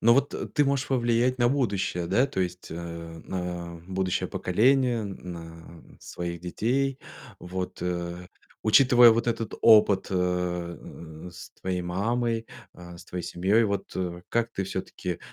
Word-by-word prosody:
но 115 Hz, +1 st, +6 dB
вот, 140 Hz, +1 st, +1 dB
э, -, -, -3 dB
ты 145 Hz, -, +2 dB
можешь 140 Hz, 0 st, 0 dB
повлиять 125 Hz, 0 st, +2 dB
на 120 Hz, 0 st, +4 dB
будущее, 100 Hz, -10 st, 0 dB
да, 120 Hz, +10 st, +3 dB
то 110 Hz, -8 st, -3 dB
есть, 90 Hz, 0 st, -3 dB
а, 85 Hz, 0 st, -7 dB
на 90 Hz, -2 st, -4 dB
будущее 95 Hz, -1 st, -1 dB
поколение, 120 Hz, +3 st, +2 dB
на 85 Hz, -3 st, -9 dB, 0.2 s
своих 85 Hz, -1 st, -5 dB
детей, 130 Hz, +9 st, -1 dB, 0.4 s
вот, 90 Hz, +1 st, -5 dB
э, 90 Hz, 0 st, -3 dB, 0.3 s
учитывая 120 Hz, +1 st, +7 dB
вот 115 Hz, +2 st, +1 dB
этот 115 Hz, -2 st, -2 dB
опыт, 105 Hz, -3 st, +6 dB
э, -, -, -1 dB
э, 90 Hz, -2 st, -3 dB
с 85 Hz, -, -11 dB
твоей 90 Hz, -1 st, -2 dB
мамой, 115 Hz, +5 st, -1 dB, 0.3 s
э, 85 Hz, -1 st, -11 dB
с -, -, -12 dB
твоей 90 Hz, -1 st, -5 dB
семьёй, 100 Hz, +6 st, +2 dB
вот, 100 Hz, -2 st, -2 dB
э, 90 Hz, -1 st, -3 dB
как 115 Hz, 0 st, 0 dB
ты 95 Hz, -, -2 dB
всё-таки 90 Hz, -2 st, -4 dB
95 Hz, 150 wpm, -27 LUFS, 90-115 Hz, 0.4 s, учитывая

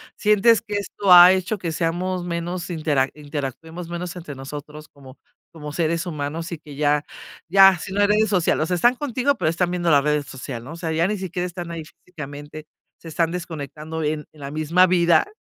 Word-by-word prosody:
sientes 210 Hz, +2 st, +4 dB
que 205 Hz, -, -6 dB
esto 200 Hz, -1 st, +2 dB
ha 175 Hz, +1 st, +10 dB
hecho 190 Hz, +3 st, -1 dB
que 170 Hz, -3 st, -3 dB
seamos 175 Hz, +3 st, -2 dB
menos 175 Hz, +1 st, -4 dB
intera 150 Hz, -5 st, 0 dB
interactuemos 150 Hz, +3 st, -6 dB
menos 175 Hz, 0 st, -5 dB
entre 170 Hz, -4 st, -8 dB
nosotros 150 Hz, +3 st, -9 dB
como 135 Hz, -2 st, -15 dB, 0.3 s
como 150 Hz, -2 st, -8 dB
seres 165 Hz, +2 st, -1 dB
humanos, 160 Hz, +1 st, -4 dB
y 170 Hz, -, -4 dB
que 150 Hz, -2 st, -12 dB
ya 145 Hz, 0 st, +1 dB, 0.4 s
ya 195 Hz, +1 st, +7 dB
si 185 Hz, -, -7 dB
no 205 Hz, -, +1 dB
eres 210 Hz, +2 st, +3 dB
social, 180 Hz, -5 st, +1 dB
o 155 Hz, -, +1 dB
sea, 180 Hz, -, -1 dB
están 240 Hz, +9 st, +3 dB
contigo, 275 Hz, +1 st, 0 dB
pero 155 Hz, -, 0 dB
están 175 Hz, +2 st, 0 dB
viendo 175 Hz, -1 st, 0 dB
las 140 Hz, -1 st, +5 dB
redes 150 Hz, -1 st, 0 dB
social, 125 Hz, -3 st, -7 dB
¿no?, 130 Hz, -, -10 dB
o -, -, -7 dB
sea, 170 Hz, -1 st, -4 dB
ya 165 Hz, +2 st, +1 dB
ni 210 Hz, +1 st, -2 dB
siquiera 180 Hz, -1 st, -4 dB
están 175 Hz, -1 st, -6 dB
ahí 165 Hz, -1 st, -5 dB
físicamente, 150 Hz, -2 st, -10 dB, 0.3 s
se -, -, -14 dB
están 165 Hz, +1 st, 0 dB
desconectando 160 Hz, -2 st, -6 dB
en 150 Hz, 0 st, -2 dB
en 155 Hz, -, -20 dB
la 140 Hz, -, -5 dB
misma 160 Hz, +5 st, +3 dB
vida, 175 Hz, -, +3 dB
165 Hz, 200 wpm, -22 LUFS, 150-180 Hz, 0.4 s, ha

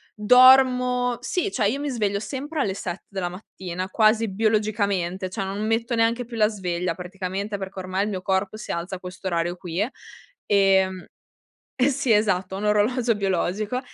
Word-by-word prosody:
Dormo 250 Hz, +1 st, +5 dB
sì, 365 Hz, +9 st, -1 dB
cioè 220 Hz, -, +1 dB
io 275 Hz, +5 st, -2 dB
mi 290 Hz, -1 st, -3 dB
sveglio 205 Hz, -5 st, -1 dB
sempre 280 Hz, +7 st, -4 dB
alle 195 Hz, -5 st, 0 dB
7 180 Hz, -2 st, -6 dB
della 190 Hz, -3 st, -3 dB
mattina, 185 Hz, -1 st, -6 dB
quasi 220 Hz, +2 st, +3 dB
biologicamente, 200 Hz, -3 st, 0 dB
cioè 195 Hz, +2 st, -4 dB
non 200 Hz, +3 st, -3 dB
metto 230 Hz, +2 st, 0 dB
neanche 230 Hz, +1 st, +1 dB
più 235 Hz, 0 st, -9 dB
la 215 Hz, -1 st, +4 dB
sveglia 180 Hz, -4 st, -3 dB
praticamente, 190 Hz, +3 st, -5 dB
perché 190 Hz, 0 st, -7 dB
ormai 185 Hz, +2 st, -1 dB
il -, -, -3 dB
mio 185 Hz, -3 st, -4 dB
corpo 190 Hz, +2 st, -1 dB
si 215 Hz, -, -6 dB
alza 170 Hz, +3 st, -4 dB
a 180 Hz, -, -9 dB
questo 185 Hz, +1 st, -7 dB
orario 170 Hz, 0 st, -1 dB
qui. 180 Hz, +4 st, -2 dB, 0.6 s
Ehm 190 Hz, -2 st, +3 dB, 0.7 s
eh 255 Hz, +3 st, +4 dB
sì, 270 Hz, -3 st, 0 dB
esatto, 195 Hz, -3 st, +2 dB
ho -, -, -4 dB
un 210 Hz, -, -3 dB
orologio 225 Hz, +3 st, +2 dB
biologico 200 Hz, +4 st, -1 dB
205 Hz, 170 wpm, -24 LUFS, 185-230 Hz, 0.7 s, Dormo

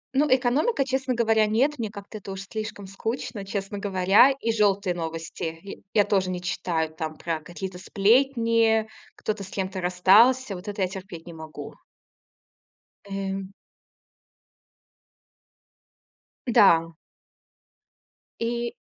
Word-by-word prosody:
Ну, 295 Hz, +2 st, +4 dB
экономика, 265 Hz, -, +2 dB
честно 265 Hz, -1 st, -1 dB
говоря, 225 Hz, -2 st, +3 dB
нет. 260 Hz, +6 st, +1 dB
Мне 220 Hz, -2 st, -2 dB
как-то 205 Hz, +1 st, -9 dB
это 195 Hz, -1 st, -8 dB
уж 195 Hz, 0 st, -6 dB
слишком 215 Hz, 0 st, -6 dB
скучно, 210 Hz, +1 st, -4 dB
честно 200 Hz, 0 st, -4 dB
говоря, 195 Hz, +5 st, +5 dB
и 265 Hz, -4 st, -1 dB
желтые 200 Hz, -4 st, +2 dB
новости 165 Hz, 0 st, -5 dB
я 195 Hz, -, -7 dB, 0.2 s
я 205 Hz, -, +6 dB
тоже 190 Hz, -2 st, +1 dB
не 180 Hz, -, -3 dB
читаю. 165 Hz, -3 st, -2 dB
Там 155 Hz, 0 st, -5 dB
про 165 Hz, -2 st, -3 dB
какие-то 180 Hz, +2 st, -7 dB
сплетни, 230 Hz, +1 st, +3 dB, 0.3 s
кто-то 210 Hz, -2 st, -3 dB
с 190 Hz, -, -10 dB
кем-то 190 Hz, -1 st, -3 dB
расстался- 200 Hz, +7 st, +4 dB
вот 180 Hz, +4 st, -10 dB
это 205 Hz, -1 st, -2 dB
я 185 Hz, -, +2 dB
терпеть 185 Hz, -3 st, -9 dB
не 170 Hz, -, -9 dB
могу. 160 Hz, -1 st, -9 dB, 1.4 s
Эм. 195 Hz, 0 st, -4 dB, 2.9 s
Н-да. 170 Hz, -8 st, +5 dB, 1.5 s
И 235 Hz, +1 st, -2 dB
200 Hz, 120 wpm, -25 LUFS, 185-230 Hz, 2.9 s, я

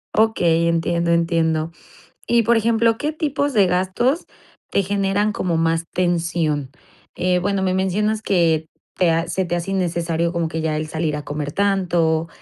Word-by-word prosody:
Okey, 170 Hz, -7 st, +3 dB
entiendo, 170 Hz, 0 st, +1 dB
entiendo. 165 Hz, -1 st, +1 dB, 0.6 s
Y 235 Hz, -1 st, +3 dB
por 235 Hz, +2 st, +3 dB
ejemplo, 225 Hz, 0 st, +2 dB
¿qué 300 Hz, +3 st, -2 dB
tipos 290 Hz, -3 st, -1 dB
de 205 Hz, -3 st, +5 dB
gastos 190 Hz, -, 0 dB, 0.4 s
te 200 Hz, -, +2 dB
generan 200 Hz, +2 st, 0 dB
como 175 Hz, -4 st, -1 dB
más 165 Hz, 0 st, +1 dB
tensión? 170 Hz, -5 st, 0 dB, 0.5 s
Eh, 180 Hz, 0 st, +1 dB
bueno, 195 Hz, +1 st, -1 dB
me 185 Hz, -1 st, +1 dB
mencionas 210 Hz, +3 st, 0 dB
que 165 Hz, -6 st, +1 dB, 0.3 s
te 180 Hz, -, +2 dB
a 165 Hz, +1 st, 0 dB
se 185 Hz, +3 st, -1 dB
te 175 Hz, 0 st, -2 dB
hace 175 Hz, +3 st, -3 dB
innecesario 170 Hz, -2 st, -1 dB
como 170 Hz, -2 st, -1 dB
que 160 Hz, 0 st, -4 dB
ya 155 Hz, -1 st, -1 dB
el 155 Hz, 0 st, -3 dB
salir 155 Hz, -1 st, -2 dB
a 150 Hz, -, -6 dB
comer 145 Hz, 0 st, -4 dB
tanto, 175 Hz, -4 st, +1 dB
175 Hz, 165 wpm, -21 LUFS, 165-200 Hz, 0.6 s, de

